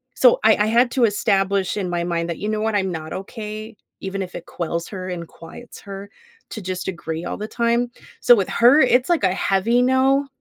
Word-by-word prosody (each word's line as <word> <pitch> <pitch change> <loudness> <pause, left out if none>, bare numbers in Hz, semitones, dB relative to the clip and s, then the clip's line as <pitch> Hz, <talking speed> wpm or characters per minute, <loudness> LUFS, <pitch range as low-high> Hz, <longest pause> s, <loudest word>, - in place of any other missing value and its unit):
so 250 -2 +5
I 220 - +7
I 210 - +2
had 240 +2 +3
to 255 -3 +1
establish, 195 -2 +1
in 190 -3 -2
my 175 -1 -1
mind, 170 -1 -2
that, 170 - -3
"You 210 - -3
know 215 0 -1
what, 220 -1 0
I'm 190 -2 0
not 160 -1 -6
okay, 215 +3 -7 0.3
even 195 0 -4
if 180 - -9
it 175 - -7
quells 170 0 -4
her, 185 -2 -6
and 170 -2 -5
quiets 170 +11 -13
her, 200 0 -9 0.4
to 220 - -6
just 185 0 -5
agree 165 -2 -5
all - - -3
the 210 +1 -5
time." 235 +1 0 0.3
So 245 - +7
with 195 -3 0
her, 245 +6 +5
it's, 250 +3 +3
like, 340 -9 +2
a 185 - +2
heavy 200 +6 +1
no, 265 +2 +2
200 Hz, 220 wpm, -21 LUFS, 185-235 Hz, 0.4 s, I